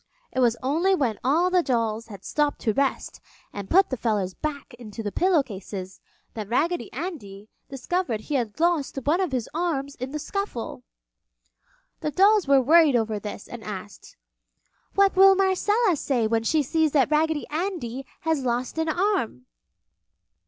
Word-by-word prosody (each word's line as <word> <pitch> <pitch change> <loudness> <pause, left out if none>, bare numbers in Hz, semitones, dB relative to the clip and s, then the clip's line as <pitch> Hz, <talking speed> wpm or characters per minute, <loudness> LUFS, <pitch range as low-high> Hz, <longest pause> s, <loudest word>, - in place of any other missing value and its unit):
It - - -3
was 235 -2 +3
only 335 +9 +2
when 245 - -1
all 330 +8 +2
the 365 -1 +4
dolls 230 -5 -1
had 200 -4 -11
stopped 295 -1 0
to 220 - +1
rest 275 +4 -1 0.3
and 200 -1 -7
put 385 -2 +4
the 260 - -1
feathers 210 -5 -1
back 285 -1 -5
into 225 -1 -8
the 205 - -3
pillow 355 - +3
cases 190 -4 -8 0.3
that 215 -2 -6
Raggedy 335 +8 0
Andy 220 - -7 0.2
discovered 270 - -2
he 295 - -6
had 235 -4 -2
lost 330 -5 +1
one 320 +8 +2
of 365 -6 -1
his 250 -4 -2
arms 305 -5 -2
in 255 0 -6
the 300 - -4
scuffle. 305 - -4 1.2
The - - -2
dolls 395 +3 +4
were 275 -1 +6
worried 310 0 +5
over 220 -2 0
this 205 0 -7
and 235 -2 -9
asked, 205 -1 -9 0.8
"What 395 -1 +4
will 385 +1 +7
Marcella 390 +2 +2
say 260 -5 0
when 225 +1 +1
she 300 +7 +1
sees 315 +2 +1
that 280 -1 +3
Raggedy 310 0 +1
Andy 310 -7 -3 0.2
has 320 -4 0
lost 245 +4 -2
an 320 0 0
arm?" 345 - -1
275 Hz, 165 wpm, -25 LUFS, 225-340 Hz, 1.2 s, will